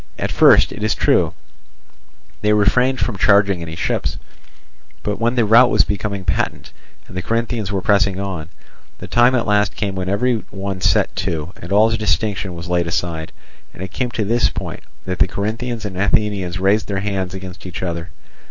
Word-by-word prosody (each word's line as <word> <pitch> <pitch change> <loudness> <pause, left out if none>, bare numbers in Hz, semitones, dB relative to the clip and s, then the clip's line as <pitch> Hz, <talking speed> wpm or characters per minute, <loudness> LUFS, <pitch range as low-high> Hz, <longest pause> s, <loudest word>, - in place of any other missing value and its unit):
At - - -2
first, - - +5
it 105 - -8
is 110 +1 +1
true, - - +2 1.1
they 105 0 +3
refrained 125 +5 +3
from 105 -6 -2
charging 100 -3 +4
any 80 -1 -6
ships; 85 - -1 0.9
but 105 - -2
when 120 +2 +1
the 120 -3 +3
rout 120 +4 +6
was - - +4
becoming 100 -2 -3
patent, 85 - -2 0.4
and - - -12
the 95 - -2
Corinthians 115 0 -2
were 95 -2 -2
pressing 100 -2 +2
on, 90 -5 -4 0.5
the - - -8
time 120 +2 +4
at 120 - 0
last 105 -1 +2
came 100 -2 -2
when 95 -1 -3
every 115 +3 +1
one 95 -1 -5
set 95 +2 +2
to, 85 0 -3
and 85 - -8
all 110 +3 +5
distinction 100 -3 -1
was 85 +1 -7
laid 90 -1 0
aside, 85 -1 -2 0.4
and 95 - -7
it 95 - -7
came 125 +5 -2
to 110 -3 -2
this 120 +3 +2
point, - - -6 0.2
that 90 -1 -3
the - - +4
Corinthians 110 +4 -3
and 100 -3 -5
Athenians 100 -2 0
raised 100 +3 +2
their 100 -1 -2
hands 95 -2 -2
against 95 0 -8
each 90 - -6
other. 85 -1 -4
100 Hz, 185 wpm, -19 LUFS, 95-110 Hz, 1.1 s, rout